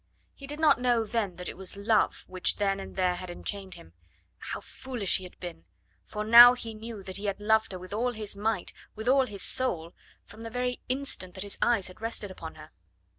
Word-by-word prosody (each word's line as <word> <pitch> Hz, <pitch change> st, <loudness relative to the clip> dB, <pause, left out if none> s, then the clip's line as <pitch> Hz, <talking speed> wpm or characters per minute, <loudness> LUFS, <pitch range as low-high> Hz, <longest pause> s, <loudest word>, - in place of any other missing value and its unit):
He 275 Hz, -, -11 dB
did 295 Hz, +2 st, -3 dB
not 310 Hz, -5 st, +5 dB
know 240 Hz, -2 st, +3 dB
then 210 Hz, -4 st, -1 dB
that 180 Hz, 0 st, -6 dB
it -, -, -5 dB
was 190 Hz, +1 st, -7 dB
Love 210 Hz, +2 st, +2 dB
which 185 Hz, -1 st, 0 dB
then 195 Hz, -1 st, 0 dB
and -, -, -8 dB
there 185 Hz, -1 st, +2 dB
had 180 Hz, 0 st, -6 dB
enchained 190 Hz, +1 st, -6 dB
him. 85 Hz, -, -14 dB, 0.4 s
Oh, -, -, -6 dB
how -, -, -6 dB
foolish 245 Hz, -8 st, -1 dB
he 185 Hz, -, -8 dB
had 180 Hz, -, -13 dB
been! 175 Hz, -, -8 dB, 0.4 s
for 210 Hz, -, -3 dB
now 240 Hz, +3 st, +10 dB
he 230 Hz, -2 st, -6 dB
knew 220 Hz, -1 st, -8 dB
that 190 Hz, 0 st, -2 dB
he 205 Hz, -, -5 dB
had 200 Hz, -1 st, -1 dB
loved 220 Hz, +1 st, +2 dB
her 185 Hz, -, -3 dB
with 185 Hz, +2 st, -9 dB
all 245 Hz, +3 st, 0 dB
his 215 Hz, -2 st, -6 dB
might, 210 Hz, -2 st, -1 dB, 0.2 s
with 220 Hz, +2 st, -6 dB
all 265 Hz, 0 st, +5 dB
his 200 Hz, -4 st, -6 dB
soul, 170 Hz, -10 st, -1 dB, 0.3 s
from 210 Hz, +2 st, -13 dB
the 230 Hz, -, -5 dB
very 250 Hz, +1 st, -2 dB
instant 255 Hz, -9 st, -2 dB
that 190 Hz, -, -4 dB
his 200 Hz, -, -7 dB
eyes 230 Hz, -6 st, +3 dB
had 185 Hz, +3 st, -13 dB
rested 225 Hz, -3 st, -3 dB
upon 165 Hz, -3 st, -8 dB
her. 155 Hz, 0 st, -13 dB
210 Hz, 230 wpm, -29 LUFS, 185-235 Hz, 0.4 s, now